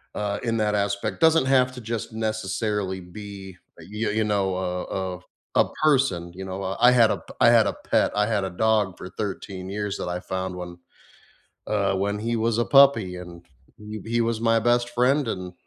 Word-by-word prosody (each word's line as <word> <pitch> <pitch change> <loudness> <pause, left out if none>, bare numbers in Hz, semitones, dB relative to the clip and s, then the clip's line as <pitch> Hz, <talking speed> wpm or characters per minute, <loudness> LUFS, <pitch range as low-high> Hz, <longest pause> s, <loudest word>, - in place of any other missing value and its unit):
uh, 105 -1 -2
in 115 -1 0
that 105 -1 +1
aspect, 100 0 -1
doesn't 160 -3 +4
have 130 -1 +3
to 125 - -9
just 110 0 -4
necessarily 105 -3 -2
be, 95 0 -10 0.2
uh, - - -11
y 110 +2 -2
y - - 0
you 110 +1 +1
know, 100 -3 0
a 90 -1 -2 0.3
a - - -11 0.4
a - - +6 0.2
person, 130 - +2
you 95 +1 -7
know? 95 +1 -5
I 95 +1 -3
I - - +5
had 115 -3 +5
a - - 0
p - - -14
I - - +7
had - - +5
a - - -1
pet, - - 0
I 105 - +3
had 105 -4 0
a - - -3
dog 105 0 +1
for 90 - -8
13 95 -2 -5
years 105 0 -3
that - - -4
I 90 - -3
found, 95 -1 -4
when, 90 -1 -7 0.9
uh, 100 -2 +1
when 100 +2 -1
he 115 +2 -1
was 115 0 0
a 120 - +1
puppy, 115 -7 +5
and 85 -1 -11 0.3
he 105 -1 -8
he 115 +1 0
was 115 -1 -1
my 115 -1 +3
best 120 +1 +2
friend, 125 +3 +2
and, 90 -4 -4
105 Hz, 210 wpm, -24 LUFS, 95-115 Hz, 0.9 s, I